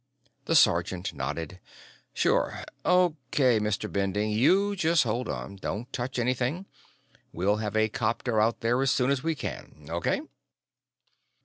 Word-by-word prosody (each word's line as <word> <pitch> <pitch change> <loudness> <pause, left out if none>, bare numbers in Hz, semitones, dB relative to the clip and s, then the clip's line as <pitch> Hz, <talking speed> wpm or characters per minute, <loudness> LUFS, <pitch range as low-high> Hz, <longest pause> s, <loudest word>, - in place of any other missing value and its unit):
The - - +1
sergeant 95 +1 +3
nodded. 75 +6 -5 0.5
"Sure. - - 0 0.2
O.K., 145 -9 +2
Mr. 105 -2 -1
Bending; 100 +2 0
you 190 - +3
just 165 -3 +3
hold 120 +2 -2
on. 100 - -5
Don't 110 +6 -5
touch 125 0 -3
anything; 125 +8 -1 0.7
we'll 100 +5 +1
have 105 -1 -2
a 110 0 +4
copter 110 +1 0
out 115 +2 +1
there 120 +3 +1
as 135 - +2
soon 125 +1 +2
as 140 -2 0
we 165 0 -1
can. 75 - -7
O.K.?" 85 0 0
115 Hz, 135 wpm, -27 LUFS, 105-135 Hz, 0.7 s, a